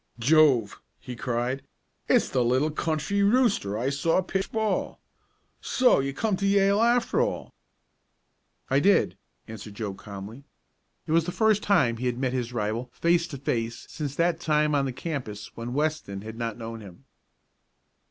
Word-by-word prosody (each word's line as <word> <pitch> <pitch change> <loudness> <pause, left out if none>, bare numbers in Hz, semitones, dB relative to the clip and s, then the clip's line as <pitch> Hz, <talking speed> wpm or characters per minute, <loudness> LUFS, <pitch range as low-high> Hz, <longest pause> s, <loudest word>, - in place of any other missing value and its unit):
"Jove!" 130 -4 +3 0.2
he 125 - -8
cried. 125 +3 -2 0.5
"It's - - +3
the 125 -2 +1
little 130 +6 +2
country 160 +6 -1
rooster 200 - +2
I 125 +5 -1
saw 165 +6 +1
pitch 190 +1 -3
ball. 220 -1 -1 0.6
So 255 - +3
you 135 0 -1
came 205 +9 -1
to 200 - 0
Yale 200 +1 +3
after 235 0 +2
all?" - - -3 1.1
"I 135 - +3
did," 195 +6 +3 0.3
answered 110 -1 -9
Joe 105 -2 -4
calmly. 100 +6 -9 0.6
It - - -5
was 165 0 +3
the 180 - -3
first 215 +1 +2
he 200 - +3 0.3
had 120 -1 -1
met 130 -1 -1
his 125 -2 -2
rival 115 +2 -2
face 170 0 +1
to 150 -5 -7
face 115 -3 -3
since 145 -3 -4
that 170 0 +1
time 150 -2 +1
on 140 -1 +2
the 135 - -2
campus 125 -7 -6
when 120 +2 -5
Weston 150 -10 -2
had 110 +1 -8
not 115 -2 -4
known 115 -1 -7
him. 95 -4 -13
140 Hz, 160 wpm, -26 LUFS, 115-170 Hz, 1.1 s, Jove